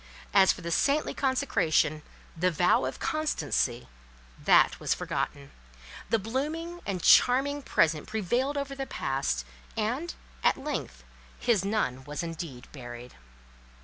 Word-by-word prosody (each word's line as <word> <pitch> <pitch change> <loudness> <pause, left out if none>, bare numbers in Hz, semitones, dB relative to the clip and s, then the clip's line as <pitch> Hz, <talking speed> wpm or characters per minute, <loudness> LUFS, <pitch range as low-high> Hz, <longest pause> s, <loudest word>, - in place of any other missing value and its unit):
As 195 -1 +7
for - - -6
the 170 0 -4
saintly 285 - +2
consecration, 195 - +1 0.3
the 180 +2 +2
vow 175 -5 +3
of 130 - -4
constancy, 150 - -1 0.6
that - - +5
was - - 0
forgotten: 140 0 -4 0.6
the 225 - +3
blooming 305 - -3
and 185 -4 -3
charming 280 +3 +5
Present 155 - +1
prevailed 240 +7 -1
over 280 -1 -3
the 270 -1 -5
Past; 135 - -2 0.3
and, 250 +11 -2 0.3
at - - +4
length, 290 +2 -5 0.3
his 225 -6 +2
nun 195 - -1
was 150 +3 -4
indeed 165 -6 -6
buried. 120 -2 -9
195 Hz, 125 wpm, -28 LUFS, -, 0.6 s, As